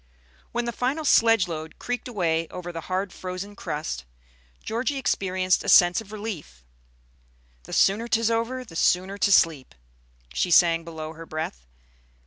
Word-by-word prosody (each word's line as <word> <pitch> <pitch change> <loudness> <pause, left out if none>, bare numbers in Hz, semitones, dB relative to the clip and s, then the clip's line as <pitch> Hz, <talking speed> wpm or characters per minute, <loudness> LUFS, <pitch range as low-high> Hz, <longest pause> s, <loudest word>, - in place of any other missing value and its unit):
When 240 0 -1
the 235 - -2
final 270 +7 -2
sledge 225 -7 +5
load 160 -1 -6
creaked 245 +1 -4
away 165 -8 0
over 175 +1 -7
the 165 -1 -6
hard 185 0 -2
frozen 185 +2 -6
crust, 150 - -4 0.6
Georgie 255 +6 -2
experienced 185 -7 +1
a 205 - -2
sense 175 +1 +6
of 210 -2 -14
relief. 200 - -7 1.0
"The - - -9
sooner 210 +4 +3
'tis 230 -1 +2
over, 240 +3 -1
the 165 - -13
sooner 185 +4 +1
to 200 - +2
sleep," 160 - +3 0.6
she 180 - 0
sang 170 -1 +5
below 160 -1 -7
her 165 0 -11
breath. 60 - -5
185 Hz, 150 wpm, -25 LUFS, 165-225 Hz, 1.0 s, sense